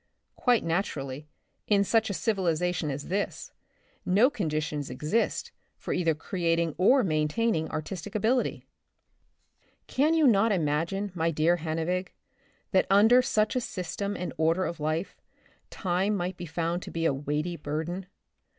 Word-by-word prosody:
*' - - -50
Quite 245 -4 +4
naturally, 150 -5 -2 0.4
in 200 -2 +4
such 220 +2 +2
a 200 - -2
civilization 180 -5 0
as 140 +1 -5
this, 200 +2 -2 0.5
no 215 +9 +4
conditions 155 - -2
exist 210 +10 -1 0.3
for - - -4
either 165 -3 +1
creating 165 -1 0
or 255 +8 +5
main 155 -5 +1
taining 220 -2 0
artistic 175 +5 -5
ability. 225 +5 0 1.2
Can 300 +5 +2
you 320 -2 +4
not 225 -2 +4
imagine, 170 +4 0
my 165 -2 0
dear 165 +2 +2
Hannevig, 165 +3 -2 0.6
that 190 - +3
under 220 +6 +6
such 215 -1 +1
a 255 - +1
system 200 0 -4
and 180 - -4
order 165 +4 +2
of 170 - -4
life, 155 +4 -2 0.5
time 190 +2 0
might 180 -1 -2
be 175 -1 -7
found 170 +2 -2
to - - -8
be 165 0 -2
a 150 - +3
weighty 150 +5 -2
burden? 160 +5 -4
175 Hz, 145 wpm, -28 LUFS, 160-205 Hz, 1.2 s, under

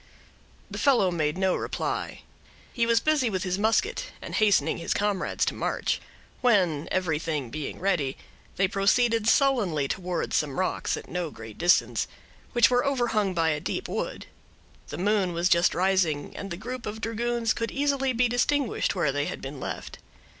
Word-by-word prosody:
The - - -5
fellow 245 -10 +4
made 155 -2 -1
no 190 -1 +2
reply. - - -3 0.5
He 235 -2 +1
was 230 -1 +4
busy 295 -3 +2
with 185 -3 -2
his 185 0 -1
musket, 225 - +1
and - - -8
hastening 210 -6 +3
his 170 - -1
comrades 205 -2 0
to - - -1
march; - - -1 0.4
when, 180 - +2
everything 160 -7 -1
being 155 -2 -5
ready, 170 -8 0 0.4
they 195 - +2
proceeded 225 +3 +2
sullenly 215 - +3
towards 180 +1 -2
some 145 -3 0
rocks 185 - -1
at - - -9
no 180 -2 -3
great 110 -5 -11
distance, 175 +1 +3 0.5
which 240 -1 +5
were 245 0 +3
overhung 230 -8 0
by 165 -1 +2
a 150 -1 0
deep - - -3
wood. - - -4 0.6
The - - -6
moon 195 -1 +1
was 170 +2 +1
just 170 0 +4
rising, 175 -5 +1
and 200 - -6
the 170 - -5
group 245 +4 -6
of 210 +1 -5
dragoons 230 +1 0
could 230 - -3
easily 275 -1 0
be 250 0 +2
distinguished 245 -1 0
where 170 -6 +1
they 145 +1 -1
had - - -5
been 135 +1 -7
left. - - -6
195 Hz, 170 wpm, -27 LUFS, 170-235 Hz, 0.6 s, which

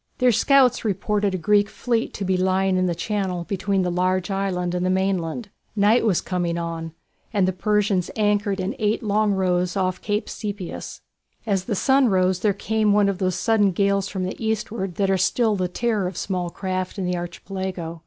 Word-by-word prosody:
Their 250 -1 +4
scouts 255 +3 +4
reported 205 -1 0
a - - -1
Greek 205 +3 +2
fleet 235 -2 -1
to 200 - -3
be 185 0 +1
lying 190 +1 +1
in 185 0 +2
the 170 - -1
channel 185 -1 -2
between 195 +1 -1
the 180 - -1
large 185 +1 0
island 185 -2 -1
and 180 0 -1
the 185 - +1
mainland. 190 +2 -1 0.2
Night 210 +3 +4
was 205 -7 +2
coming 175 -2 -2
on, 165 -1 -4 0.4
and 200 -4 +2
the 185 - 0
Persians 200 -1 +1
anchored 205 -2 +1
in 185 +2 -2
eight 215 +2 0
long 210 -1 +1
lines 180 0 0
off 185 -1 -1
Cape 210 0 -1
Sepias. 205 -4 -6 0.4
As 195 -4 0
the 215 - -1
sun 265 +4 +3
rose 185 -1 +2
there 210 +2 +2
came 215 +1 +1
one 205 -1 +4
of 195 -2 -3
those 185 -2 0
sudden 205 -4 +2
gales 200 +1 +1
from 190 -2 -4
the 185 +5 -5
eastward 215 -4 -2
that 195 -1 +1
are 190 - +2
still 220 +3 +2
the 185 -2 -1
terror 210 0 -1
of 180 - -6
small 180 -3 -2
craft 185 +1 -4
in 190 - -2
the 180 0 0
Archipelago. 175 -1 -5
195 Hz, 195 wpm, -23 LUFS, 185-210 Hz, 0.4 s, Their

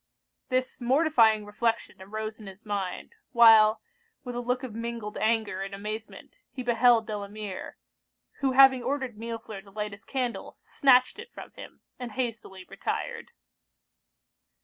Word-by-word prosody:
This 255 0 -1
mortifying 240 -5 +3
reflection 210 -2 -2
arose 215 +3 -6
in 210 - -11
his 195 +3 -12
mind, 200 - -4 0.2
while, 225 -2 +7 0.4
with 245 - -6
a 240 - -3
look 250 +2 -2
of 250 -4 -6
mingled 230 -2 -5
anger 215 -3 0
and 195 0 -5
amazement, 215 +2 -7
he 255 - -6
beheld 240 -1 +4
Delamere, 205 -2 -6 0.6
who 270 -2 +1
having 265 -1 +7
ordered 265 -3 -3
Millefleur 225 -2 -7
to 195 - -18
light 210 +1 -4
his 200 0 -12
candle, 250 -1 -4
snatched 255 +5 +3
it 470 +2 -10
from - - -11
him, - - -12 0.2
and 245 -3 -6
hastily 225 -7 -4
retired. - - -4
225 Hz, 140 wpm, -27 LUFS, 210-250 Hz, 0.6 s, while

